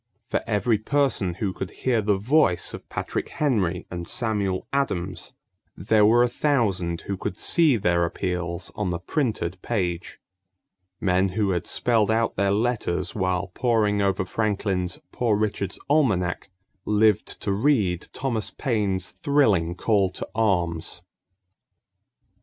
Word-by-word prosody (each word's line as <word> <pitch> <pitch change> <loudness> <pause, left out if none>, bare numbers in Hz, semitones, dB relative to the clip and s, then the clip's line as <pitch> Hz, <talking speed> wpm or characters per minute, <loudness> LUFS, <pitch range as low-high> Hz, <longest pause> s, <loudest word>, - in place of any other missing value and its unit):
For - - +1
every 105 0 +1
person 120 -8 +1
who 95 0 -2
could 95 - -5
hear 120 -4 0
the 105 -1 +1
voice 115 - +2
of - - -9
Patrick - - -3
Henry 100 - 0
and 85 -1 -5
Samuel 105 -6 -1
Adams, 95 -10 -2 0.4
there 105 +2 +4
were 120 +2 +5
a - - +3
thousand 105 - 0
who 100 - -4
could 95 0 -5
see 160 -7 +4
their 90 -4 +2
appeals 85 0 -3
on 105 -3 -2
the 85 - -1
printed 95 - -2
page. 90 -6 -3 0.8
Men 95 0 +2
who 100 +1 0
had 90 -1 -2
spelled 115 -4 +2
out 115 +1 +1
their 100 +1 +1
letters 100 -5 0
while 95 -1 -1
poring 110 -4 +1
over 95 -1 +1
Franklin's 95 -3 -1
Poor 115 -4 +1
Richard's 100 -3 -2
Almanac 100 - +1 0.3
lived 105 -1 +2
to - - -1
read 100 - +1
Thomas 125 -5 -2
Paine's 100 -8 -1
thrilling 105 - +2
call 100 -1 +2
to 90 - -6
arms. 90 -5 0
100 Hz, 135 wpm, -24 LUFS, 90-115 Hz, 0.8 s, were